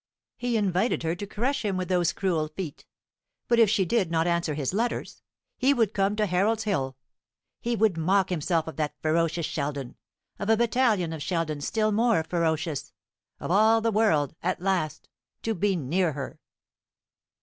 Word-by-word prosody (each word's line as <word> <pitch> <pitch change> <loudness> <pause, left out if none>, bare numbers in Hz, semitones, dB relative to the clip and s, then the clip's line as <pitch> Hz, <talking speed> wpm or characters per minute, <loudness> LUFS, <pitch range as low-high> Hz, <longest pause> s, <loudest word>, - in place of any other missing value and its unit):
He 245 -2 -1
invited 195 0 +1
her 165 0 0
to 200 +4 -6
crush 250 +7 -1
him 200 -3 -1
with 185 -1 -2
those 180 -3 +2
cruel 170 -6 0
feet. 155 -1 -7 0.6
But 235 -1 +3
if 225 -3 +6
she 200 -3 +2
did 190 -1 +1
not 165 0 +1
answer 170 -3 0
his 140 +1 -2
letters, 235 +4 -2 0.4
he 275 +2 +4
would 225 -4 +1
come 195 +1 +1
to 210 0 +1
Harold's 205 +4 +1
Hill. 135 -11 -1 0.6
He 235 0 -1
would 215 -5 +2
mock 190 +4 +2
himself 165 -1 0
of 160 - -8
that 150 -2 -2
ferocious 165 +1 +1
Sheldon 140 -4 -4 0.4
of 205 - -3
a 225 - +5
battalion 225 -7 +2
of 160 - -6
Sheldons 155 -4 -2
still 215 -1 +1
more 225 -4 +2
ferocious 160 -3 -1 0.5
of - - -4
all 220 +4 +5
the 225 0 0
world, 200 -10 +2
at 185 +2 -1
last 180 -4 -1 0.4
to 225 - 0
be 200 0 +1
near 170 +2 0
her." 135 -2 -6
185 Hz, 170 wpm, -27 LUFS, 160-215 Hz, 0.6 s, if